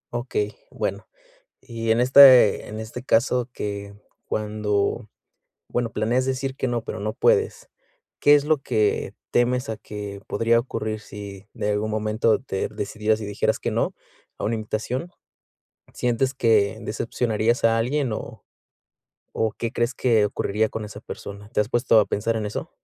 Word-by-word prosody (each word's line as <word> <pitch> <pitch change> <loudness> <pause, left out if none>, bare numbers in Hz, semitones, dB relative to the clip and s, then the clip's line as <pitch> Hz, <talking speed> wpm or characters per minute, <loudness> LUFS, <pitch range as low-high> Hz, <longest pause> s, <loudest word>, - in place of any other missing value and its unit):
Okey, 420 -1 -2
bueno, - - -4 0.5
y 115 -2 -3
en 115 - +3
este 130 -3 +7
en 110 +1 -6
este 120 +3 -7
caso 125 0 +2
que 100 0 -5 0.3
cuando, 105 +1 -1 0.6
bueno, 120 -2 -1
planeas 120 +4 +1
decir 135 0 -2
que 130 - -2
no, 120 -2 -1
pero - - -5
no 105 +1 -3
puedes, - - +1 0.5
¿qué 145 0 +7
es 145 0 +2
lo 155 -2 +2
que 105 -5 0 0.2
temes 125 0 +1
a 110 - -3
que 100 -1 -7
podría 115 +1 +2
ocurrir 110 -3 -3
si 100 -1 -10
de 105 - -1
algún 105 +1 -1
momento 110 +1 +1
te 110 -7 -3
decidieras 110 +1 -1
y - - -4
dijeras 100 0 0
que - - -3
no - - -1 0.4
a - - -6
una 110 - 0
invitación? 115 +8 -3 0.9
¿Sientes 125 +2 0
que 110 -4 +3
decepcionarías 115 +1 -1
a 115 0 +4
alguien 130 +1 0
o - - -7 0.9
o 110 -1 +1
qué 115 -1 -4
crees 120 +1 -1
que 115 -5 +3
ocurriría 105 +1 0
con 110 -1 -5
esa 105 0 -9
persona? 100 0 -9
¿Te 105 - +1
has 105 - -3
puesto 120 -2 +4
a 105 - +3
pensar 115 +3 -1
en 110 - -2
eso? 105 - -5
110 Hz, 160 wpm, -24 LUFS, 105-125 Hz, 0.9 s, este